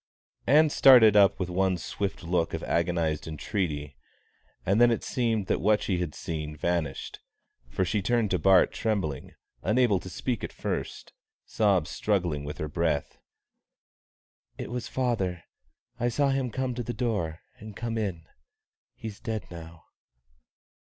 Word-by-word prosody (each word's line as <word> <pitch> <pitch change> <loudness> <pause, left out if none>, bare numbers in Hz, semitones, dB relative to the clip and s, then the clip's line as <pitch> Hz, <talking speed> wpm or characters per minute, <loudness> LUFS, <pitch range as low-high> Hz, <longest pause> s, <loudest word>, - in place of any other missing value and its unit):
Ann 150 +4 +5
started 120 -8 +7
up 100 -2 +5
with 90 - -1
one 95 0 +1
swift 100 +2 -4
look 85 -1 0
of - - -6
agonised 85 -3 0
entreaty, 75 - -3 0.7
and 100 +5 +3
then 120 - +7
it 115 - 0
seemed 115 -5 0
that - - 0
what 105 +1 +3
she 90 -3 0
had 85 -4 -3
seen 75 -2 -5
vanished, 80 -3 -2 0.5
for - - 0
she 105 +3 0
turned 115 0 +1
to 90 - +1
Bart 95 -2 +5
trembling, 95 - -2 0.3
unable 110 -3 +2
to 95 - -9
speak 120 +7 -3
at - - -4
first, - - -5 0.3
sobs 100 -7 +1
struggling 90 -8 -1
with 75 +1 -6
her 75 - -3
breath. 80 -2 -1 1.4
"It - - -6
was 125 -1 -4
father 100 -9 -1 0.6
I 120 - +1
saw 140 +4 +1
him 135 -2 0
come 130 +2 -2
to 120 - -4
the 120 +1 -5
door 100 -10 -2 0.2
and 110 -1 -10
come 115 +1 -3
in. 95 -7 -3 0.7
He's 110 -2 -8
dead 110 -3 -4
now." 85 -1 -10
95 Hz, 150 wpm, -27 LUFS, 85-115 Hz, 1.4 s, started